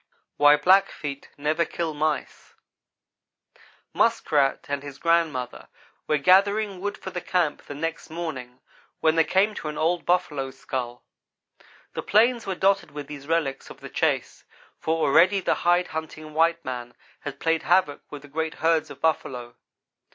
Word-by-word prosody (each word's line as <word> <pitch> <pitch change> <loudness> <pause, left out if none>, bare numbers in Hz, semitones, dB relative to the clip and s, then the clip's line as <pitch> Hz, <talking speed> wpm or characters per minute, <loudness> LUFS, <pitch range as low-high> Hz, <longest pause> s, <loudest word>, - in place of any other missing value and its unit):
WHY 145 0 +7
BLACKFEET 150 -4 +1
NEVER 155 +3 +1
KILL 165 0 -3
MICE 150 0 -3 1.4
MUSKRAT 140 -2 +2
and 140 -1 -2
his 140 -1 -9
grandmother 160 -7 0 0.4
were 150 - +2
gathering 195 +4 +3
wood 205 +1 -3
for 190 - -8
the 180 - -4
camp 175 -4 0
the 145 - -9
next 165 +3 -4
morning, 145 -7 -6 0.4
when 160 0 +3
they 165 - +5
came 195 +6 +2
to 160 - -6
an 150 - -5
old 170 +2 +1
buffalo 150 -7 0
skull. 125 -2 -5 0.9
The - - -3
plains 235 +3 +3
were 190 - -1
dotted 195 +2 +2
with 145 -1 -7
these 140 -1 -10
relics 155 -5 -1
of - - -12
the - - -9
chase, - - -1 0.4
for 160 +1 0
already 180 +8 +5
the 185 - +1 0.2
hide 175 +1 +3
hunting 155 -1 -7
white 165 +2 +2
man 120 -1 -6 0.2
had 140 -1 -7
played 165 0 +1
havoc 175 -4 +2
with 145 -1 -9
the - - -12
great 160 +2 -3
herds 165 -1 +1
of - - -11
buffalo. 125 -6 -1
160 Hz, 155 wpm, -25 LUFS, 145-175 Hz, 1.4 s, WHY